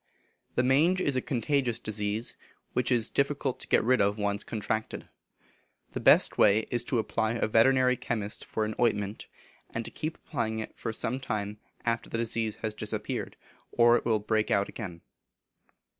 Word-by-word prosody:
The 125 - +3
mange 155 +8 +4
is 145 -7 +1
a 130 - +1
contagious 130 -2 0
disease, 110 0 -2 0.4
which 125 0 0
it - - +6
is 115 -1 0
difficult 140 -2 0
to - - -7
get - - +3
rid 125 +1 +3
of 100 +1 +2
when 105 - -3
once 100 0 0
contracted. 110 0 -3 0.8
The - - -4
best - - +5
way 105 +1 +6
is 120 -1 +1
to 125 - 0
apply 110 0 0
to 120 - -2
a - - +3
veterinary 125 +3 +4
chemist 105 -3 -3
for 110 - -2
an 110 - -3
ointment, 105 -3 0 0.4
and 115 0 -4
to - - -6
keep 155 +1 -4
applying 115 -7 -3
it 110 - -6
for 115 - -4
some 115 +3 -1
time 105 -5 -3 0.3
after 115 -1 -1
the - - -2
disease 115 -1 -1
has 110 -1 -1
disappeared, - - -3 0.4
or 120 0 +5
it - - 0
will 115 -2 +2
break 105 +1 0
out 100 0 +2
again. 90 -7 -7
115 Hz, 185 wpm, -29 LUFS, 110-125 Hz, 0.8 s, it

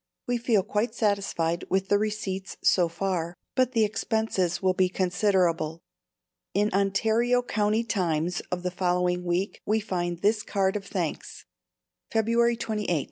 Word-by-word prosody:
We 245 -1 0
feel 225 -4 +2
quite 215 +3 -1
satisfied 195 -6 0
with 190 +1 0
the 205 - +4
receipts 205 -3 -3
so 180 -2 +4
far, 175 -1 -2 0.2
but 255 -1 +2
the 225 -2 +4
expenses 215 -5 -1
will 185 -1 +2
be 185 0 +2
considerable. 180 -4 +1 0.7
In 205 0 +2
Ontario 220 +5 +2
County 215 -1 +1
Times 175 -5 -1
of 180 0 -2
the 180 - -1
following 180 0 0
week 180 +3 -1
we 215 +1 +1
find 175 -4 -3
this 210 +1 +3
card 195 -2 0
of 200 -1 -4
thanks: - - -4 0.7
February 230 +1 +2
28. 210 -8 -1
195 Hz, 140 wpm, -27 LUFS, 180-220 Hz, 0.7 s, the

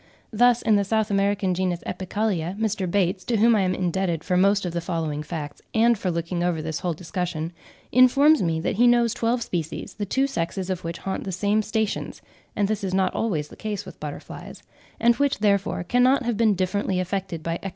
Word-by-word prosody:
Thus 245 +2 +4
in 215 -2 +4
the 200 - +2
South 215 +1 0
American 200 -1 +1
genus 180 -1 -1
Epicalia, 190 -2 -2
Mr. 210 -4 -1
Bates, 185 0 0
to 235 - +1
whom 230 +2 +5
I 210 - +3
am 185 -1 +1
indebted 180 -2 -1
for 180 - 0
most 195 +2 +3
of 175 - -3
the 170 - -2
following 165 -4 -2
facts, 150 -1 -6
and 235 +2 +5
for 195 -3 -3
looking 170 +1 -2
over 175 -2 0
this 155 0 -3
whole 175 -3 -2
discussion, 170 -1 -4 0.4
informs 275 +5 +5
me 165 -2 0
that 180 - -2
he 245 +2 +5
knows 240 -1 +4
twelve 235 0 0
species, 165 -2 -4
the 205 -2 -4
two 265 +7 +1
sexes 190 -5 -3
of 185 -1 -4
which 165 0 -4
haunt 190 - -4
the 190 - -4
same 205 +4 +1
stations 215 0 -3 0.3
(and 205 - +1
this 215 0 -2
is 190 -1 -1
not 190 -1 +1
always 155 -10 -1
the - - -12
case 215 -2 -4
with - - -11
butterflies), - - -8 0.4
and 235 0 +4
which, 285 -1 +1
therefore, 200 -4 +1
cannot 250 +7 +3
have 240 -1 -1
been 215 -1 +3
differently 185 0 -1
affected 185 -3 -3
by 165 - -2
external 165 - -2
conditions. 195 - -5
195 Hz, 215 wpm, -24 LUFS, 175-220 Hz, 0.4 s, whom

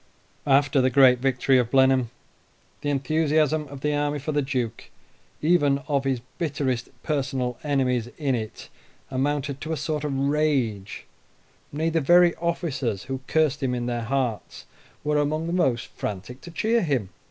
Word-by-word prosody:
After 140 0 +4
the 130 - +3
great 130 -1 +6
victory 130 0 +2
of 120 -2 0
Blenheim 130 -2 +4 0.7
the 145 - -2
enthusiasm 155 +2 +1
of 140 -1 -10
the 150 0 0
army 145 0 0
for 145 +2 -4
the 145 -1 +1
Duke, 125 -4 -3 0.5
even 150 -4 +3
of 140 -3 0
his 130 -3 0 0.2
bitterest 140 -7 -1
personal 130 -5 -2
enemies 130 -5 0
in 140 -4 0
it, 110 -3 -5 0.4
amounted 140 +1 -1
to 155 - -4
a 160 - -1
sort 155 0 -2
of 140 -2 -2
rage 135 -8 0 0.7
nay, 160 +3 -1
the 165 0 +1
very 175 +3 +5
officers 150 - -2
who 130 0 -5
cursed 155 -3 +1
him 125 -2 0
in 120 -1 -3
their 120 -1 -2
hearts 120 -2 -3 0.4
were 150 0 +1
among 155 +2 0
the 170 - -3
most 130 -10 +1
frantic 105 +5 -6
to - - -10
cheer 220 +7 +1
him. 135 - -1
140 Hz, 160 wpm, -25 LUFS, 125-150 Hz, 0.7 s, great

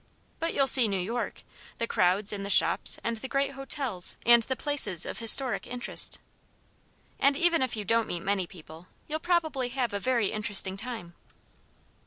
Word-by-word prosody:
But 330 - -3
you'll 275 - +3
see 260 -3 +6
New 200 -2 -2
York 230 +6 -4 0.3
the 230 - -1
crowds 195 0 +1
and 200 -1 -5
the 200 - -5
shops - - +3
and 230 0 -2
the 265 - -7
great 275 +1 -1
hotels 270 -8 -4
and 235 0 +7
the 260 +4 -3
places 235 - +1
of - - -6
historic 240 +2 +3
interest. 245 0 -1 1.0
And 275 0 +3
even 340 -1 +2
if 255 -3 -1
you 210 -2 -5
don't 230 +2 +1
meet 175 0 -5
many 195 -2 -1
people, 160 0 -14 0.2
you'll 310 +1 -3
probably 315 -7 -1
have 245 -3 -3
a 200 - -2
very 235 -2 0
interesting 205 -2 +2
time." 210 -5 -8
230 Hz, 175 wpm, -27 LUFS, 200-270 Hz, 1.0 s, and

